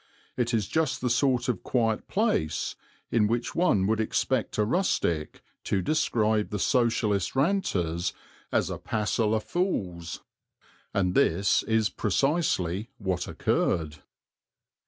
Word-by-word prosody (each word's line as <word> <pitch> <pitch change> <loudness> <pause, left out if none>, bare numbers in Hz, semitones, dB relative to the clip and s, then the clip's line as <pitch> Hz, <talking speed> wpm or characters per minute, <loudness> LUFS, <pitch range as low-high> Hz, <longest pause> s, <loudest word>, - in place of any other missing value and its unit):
It 120 -2 0
is 110 -5 0
just 160 -1 0
the 125 -1 0
sort 125 0 +2
of 120 -7 -1
quiet 115 -3 0
place 190 - 0 0.4
in 110 -2 +3
which 120 +2 -1
one 165 - +2
would 110 +2 +1
expect 110 +2 0
a 105 - +3
rustic 95 - 0 0.2
to 95 - 0
describe 110 - +1
the 105 - -3
Socialist 110 -6 +1
ranters 95 - 0 0.4
as - - +1
"a - - -5
passel 110 +1 0
o' - - +2
fools"; 95 - -3 0.7
and 90 -2 +1
this 95 +4 +3
is 110 0 +1
precisely 110 - 0
what 95 -4 -2
occurred. 75 -2 0
110 Hz, 125 wpm, -27 LUFS, 95-125 Hz, 0.7 s, in